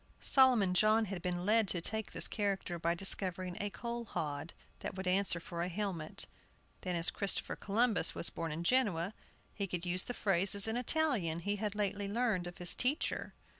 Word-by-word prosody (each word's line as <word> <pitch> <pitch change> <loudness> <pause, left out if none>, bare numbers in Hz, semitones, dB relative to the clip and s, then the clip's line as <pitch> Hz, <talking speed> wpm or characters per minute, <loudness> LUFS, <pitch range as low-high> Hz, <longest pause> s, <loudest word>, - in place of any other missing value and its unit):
Solomon 250 -9 +4
John 215 +4 +3
had 190 -3 -6
been 180 0 -3
led 220 +1 +3
to 180 - 0
take 220 +5 -2
this - - +1
character 195 -4 -2
by 170 +1 0
discovering 185 -1 +2
a 205 - -2
coal 235 +2 -5
hod 150 -5 -4 0.3
that - - -6
would 190 0 -5
answer 185 -1 +1
for 170 0 -6
a 175 - -1
helmet; 180 -4 -3 0.6
then, 180 -1 -3
as 170 0 +1
Christopher 200 -1 0
Columbus 220 +1 +1
was - - +4
born 165 -1 -4
in 160 +3 -4
Genoa, 200 -5 +1 0.4
he 200 -2 -3
could 180 -1 -3
use 180 +1 +4
the 245 - -4
phrases 195 +1 +3
in 220 - -1
Italian 245 - 0
he 205 +3 -2
had 210 0 -3
lately 205 -1 -1
learned 210 -4 0
of 175 - -9
his 175 -1 +5
teacher. 265 +5 -2
195 Hz, 185 wpm, -33 LUFS, 175-215 Hz, 0.6 s, his